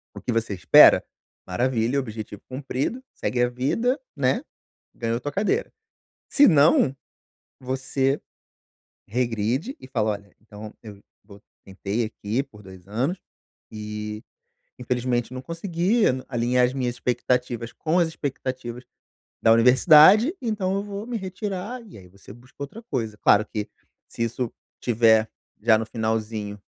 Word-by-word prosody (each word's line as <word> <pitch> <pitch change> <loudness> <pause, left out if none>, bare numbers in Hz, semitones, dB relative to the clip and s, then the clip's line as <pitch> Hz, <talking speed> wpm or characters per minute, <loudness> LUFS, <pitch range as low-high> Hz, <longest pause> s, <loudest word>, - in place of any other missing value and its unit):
o - - -8
que - - -2
você 115 -2 -1
espera, 90 - +7 0.4
maravilha, 120 +6 0
objetivo 110 -5 -7
cumprido, 135 - -3
segue 125 - -2
a 125 - +2
vida, 225 - 0 0.2
né. 130 -3 +1 0.5
Ganhou 115 0 -2
tua 145 +2 -4
cadeira. 215 - 0 0.6
Senão, 155 - +5 0.7
você 130 +1 -1 0.9
regride 120 - -1
e - - -12
fala: 110 -4 0
"Olha, 100 -1 -8
então 105 -1 -11
eu 105 -3 -11 0.2
vo 100 0 -15 0.2
tentei 100 +4 -3
aqui 110 +3 -3
por 110 -7 -17
2 95 -1 -14
anos, 130 - -1 0.5
e 105 0 -6 0.6
infelizmente 125 0 -1
não 130 - -5
consegui 175 - 0 0.2
alinhar 125 0 +2
as 125 - -2
minhas 125 -3 -2
expectativas 125 -2 -1
com 165 +3 0
as 170 - +3
expectativas 130 -5 -5 0.6
da 115 - +5
universidade, 155 - +7
então 210 -6 -1
eu 200 - -1
vou 205 +1 -6
me 245 - -4
retirar." 200 +4 -5
E - - -14
aí 95 -2 -14
você 100 +2 -15
busca 120 +3 -19
outra 140 +11 -7
coisa, 115 - -3
claro 105 0 +4
que, 105 -3 -5 0.4
se 115 - -3
isso 115 +1 -2 0.3
tiver 110 -2 +4 0.3
já 110 0 +5
no 110 - -3
finalzinho 110 -2 -3
125 Hz, 135 wpm, -24 LUFS, 110-150 Hz, 0.9 s, espera